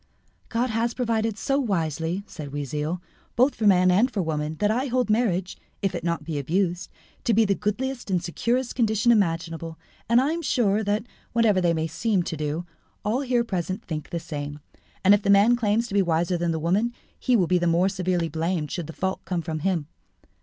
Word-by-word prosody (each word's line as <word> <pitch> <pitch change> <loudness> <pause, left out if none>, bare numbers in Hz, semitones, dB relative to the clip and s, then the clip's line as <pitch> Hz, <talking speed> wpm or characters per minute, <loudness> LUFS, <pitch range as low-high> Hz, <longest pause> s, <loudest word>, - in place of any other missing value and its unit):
"God 240 +1 0
has 230 +1 0
provided 225 -3 0
so 275 +3 0
wisely," 170 - -1
said 145 -8 -8
Oisille, 150 +4 -3 0.4
"both 255 +4 +4
for 215 - 0
man 185 -2 +5
and 215 +8 +4
for 205 -7 -1
woman, 155 -1 -2
that 205 +6 +1
I 255 +5 0
hold 250 -3 +1
marriage, 195 -5 0 0.3
if 195 -1 +1
it 175 - -3
be - - -9
not 170 -1 0
abused, 170 +4 -1 0.3
to 230 - +2
be 225 0 +5
the 200 - +2
goodliest 240 +5 -3
and 185 -2 +2
securest 235 +9 -1
condition 220 -1 +2
imaginable, 165 -5 0 0.3
and 235 +1 +6
I 275 +4 +2
am 335 +1 -2
sure 220 -8 +1
that, 205 +1 0 0.3
whatever 220 -5 +3
they 170 -1 +2
may 160 0 0
seem 180 +4 0
to 165 - -4
do, 155 +3 -3 0.4
all 225 +6 +1
here 250 -3 +1
present 190 -1 -3
think 155 -3 -5
the 170 - -3
same. 145 -2 -6 0.5
And 200 - +8
if 205 - +4
the 200 - -2
man 200 +4 +6
claims 230 0 +1
to - - -7
be 200 - +4
wiser 170 0 +1
than 170 0 0
the 160 - -1
woman, 195 +9 +1 0.3
he 255 - +2
will 190 -6 +4
be 180 +1 +2
the 175 - +1
more 170 +3 +3
severely 185 -3 0
blamed 160 -1 -2
should 175 -4 -4
the 165 - -8
fault 190 +3 -2
come 175 -3 -2
from 160 -2 -3
him. 170 -2 0
190 Hz, 210 wpm, -25 LUFS, 165-225 Hz, 0.5 s, And